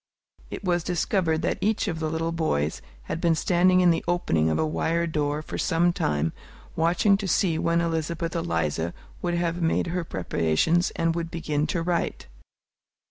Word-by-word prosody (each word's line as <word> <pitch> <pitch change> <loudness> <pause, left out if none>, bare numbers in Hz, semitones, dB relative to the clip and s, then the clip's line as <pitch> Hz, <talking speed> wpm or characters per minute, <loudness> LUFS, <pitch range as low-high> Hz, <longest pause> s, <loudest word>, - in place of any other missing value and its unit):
It - - -7
was 175 -3 +1
discovered 175 -2 0
that - - -1
each 215 0 +1
of 165 -4 -2
the 160 -1 -1
little 165 +1 -1
boys 80 - -1 0.2
had 165 - -4
been 170 -2 +3
standing 180 +2 +3
in 175 -1 +5
the 165 - 0
opening 85 - +1
of 80 - +1
a - - +1
wire 165 +2 0
door 150 -2 -1
for - - -6
some 175 0 +2
time, 75 - 0 0.4
watching 175 +5 +3
to 200 -1 -4
see 165 -2 +2
when 170 0 +2
Elizabeth 165 0 -2
Eliza 85 0 -1 0.3
would 175 -1 -1
have 170 0 -1
made 165 - +1
her 180 -1 -1
preparations 95 - +1
and 165 0 +1
would 165 0 -3
begin 155 -3 -1
to 170 -3 -1
write. 170 0 -1
165 Hz, 175 wpm, -25 LUFS, 155-175 Hz, 0.4 s, in